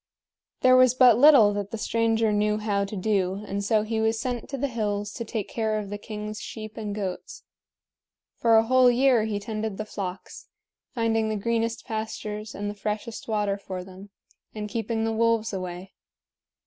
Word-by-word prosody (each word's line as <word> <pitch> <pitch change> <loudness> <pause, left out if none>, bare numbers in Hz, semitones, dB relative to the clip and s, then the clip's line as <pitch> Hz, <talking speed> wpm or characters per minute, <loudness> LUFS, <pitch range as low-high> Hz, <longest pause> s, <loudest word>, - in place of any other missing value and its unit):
There 255 0 +6
was 255 -1 +5
but 250 -3 +6
little 260 -8 +7
that 200 -1 -3
the 225 - -5
stranger 225 0 +1
knew 210 0 +1
how 205 -2 0
to 200 - -7
do, 195 0 0
and 200 0 -3
so 215 +1 +2
he 220 0 -2
was 220 0 +1
sent 245 0 -4
to 275 - -4
the 280 +2 -1
hills 205 -4 -2
to 235 - -5
take 220 -3 -4
care 220 -2 -1
of 205 -2 -5
the 205 - -4
king's 210 0 -6
sheep 215 -1 -8
and 210 -2 -4
goats. 190 -3 -5 0.9
For 230 -1 +4
a 220 - +5
whole 255 +2 +5
year 245 -2 +3
he 210 -2 -2
tended 215 -1 -4
the 215 - -4
flocks, 190 -3 -7 0.5
finding 225 -2 +1
the 215 - -1
greenest 230 +2 -1
pastures 215 -1 -5
and 205 - -4
the 205 - -3
freshest 210 +2 -5
water 205 -2 0
for 185 -2 -6
them, 190 +2 -12 0.5
and 210 -1 -4
keeping 225 +1 -2
the 225 0 0
wolves 230 -1 +1
away. 185 0 -6
215 Hz, 185 wpm, -26 LUFS, 205-230 Hz, 0.9 s, little